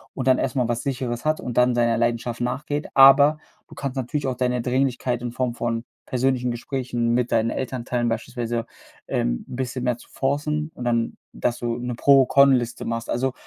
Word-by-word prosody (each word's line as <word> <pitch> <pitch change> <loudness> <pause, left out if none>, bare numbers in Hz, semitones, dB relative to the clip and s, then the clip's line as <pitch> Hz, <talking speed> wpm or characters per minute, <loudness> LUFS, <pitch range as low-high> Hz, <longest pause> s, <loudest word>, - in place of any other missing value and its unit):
und 130 -1 -3
dann 130 -1 +5
erst - - -1
mal 125 -3 +1
was 120 0 -1
Sicheres 125 -3 -3
hat 155 0 +1
und 120 - -5
dann 125 0 +4
seiner 120 -1 +2
Leidenschaft 120 0 -1
nachgeht. 145 +4 -2
Aber 140 +3 +7 0.3
du - - -14
kannst 140 -2 -4
natürlich 135 +3 -2
auch 130 -1 -1
deine 125 -1 0
Dringlichkeit 125 -1 0
in 120 -1 -4
Form 125 0 -1
von 115 0 -3 0.2
persönlichen 125 -1 0
Gesprächen 120 -1 -2
mit 125 0 0
deinen 115 +1 +2
Elternteilen 125 -2 -2
beispielsweise, 120 0 -3 0.4
ähm, - - -1
'n - - -7
bisschen 130 0 -3
mehr 125 -2 0
zu - - -17
forcen 150 +3 -1
und - - -8
dann 115 -1 0 0.2
dass 120 - -1
du 120 -1 -2
'ne 125 0 -4
Pro-Con 140 +2 +5
Liste 120 -2 -1
machst. 115 0 -3
Also, 130 +2 0
125 Hz, 190 wpm, -23 LUFS, 120-135 Hz, 0.4 s, Aber